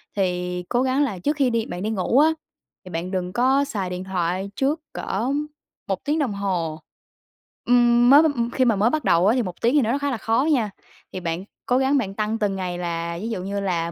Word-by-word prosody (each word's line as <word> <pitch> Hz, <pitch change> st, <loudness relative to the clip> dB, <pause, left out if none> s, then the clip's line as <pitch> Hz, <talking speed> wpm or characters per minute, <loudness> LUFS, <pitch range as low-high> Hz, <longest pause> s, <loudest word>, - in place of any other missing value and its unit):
thì 180 Hz, -2 st, -1 dB
cố 245 Hz, -, +1 dB
gắng 265 Hz, +2 st, +2 dB
là 205 Hz, -10 st, -2 dB
trước 295 Hz, -, 0 dB
khi 275 Hz, -3 st, +2 dB
đi 230 Hz, -2 st, 0 dB
bạn 175 Hz, -, -6 dB
đi 215 Hz, -, -1 dB
ngủ 220 Hz, +5 st, +1 dB
á, 310 Hz, -, +6 dB, 0.5 s
thì 185 Hz, -, -11 dB
bạn 170 Hz, +2 st, -4 dB
đừng 180 Hz, -1 st, -3 dB
có 260 Hz, +4 st, +3 dB
xài 195 Hz, -8 st, -3 dB
điện 180 Hz, 0 st, -5 dB
thoại 185 Hz, +1 st, -2 dB
trước 290 Hz, +4 st, 0 dB
cỡ 225 Hz, +7 st, -2 dB, 0.6 s
1 195 Hz, -2 st, -2 dB
tiếng 305 Hz, +2 st, +1 dB
đồng 255 Hz, -8 st, 0 dB
hồ. 180 Hz, -6 st, -2 dB, 0.9 s
Ừm, 240 Hz, 0 st, +5 dB
mới 285 Hz, +4 st, +8 dB
m 255 Hz, -7 st, 0 dB
khi 260 Hz, 0 st, +2 dB
mà 230 Hz, -3 st, +3 dB
mới 205 Hz, +4 st, +3 dB
bắt 310 Hz, +3 st, -1 dB
đầu 170 Hz, +3 st, +3 dB
á, 215 Hz, -, +5 dB
thì 255 Hz, -, +2 dB
1 180 Hz, -3 st, -7 dB
tiếng 235 Hz, +2 st, +3 dB
thì 295 Hz, -, +5 dB
nó 235 Hz, +3 st, +1 dB
khá 285 Hz, 0 st, -1 dB
là 245 Hz, -, -2 dB
khó 225 Hz, +3 st, +1 dB
nha, 230 Hz, -8 st, +1 dB, 0.4 s
thì 185 Hz, -, -4 dB
bạn 170 Hz, +1 st, -3 dB, 0.2 s
cố 250 Hz, -, +2 dB
gắng 270 Hz, +2 st, +2 dB
bạn 200 Hz, -7 st, -2 dB
tăng 215 Hz, +2 st, -1 dB
từng 205 Hz, -3 st, 0 dB
ngày, 180 Hz, -2 st, -3 dB
là 170 Hz, -1 st, -3 dB
ví 225 Hz, -, -3 dB
dụ 190 Hz, -5 st, -3 dB
như 200 Hz, +1 st, -3 dB
là: 170 Hz, -4 st, -1 dB
210 Hz, 235 wpm, -23 LUFS, 180-255 Hz, 0.9 s, mới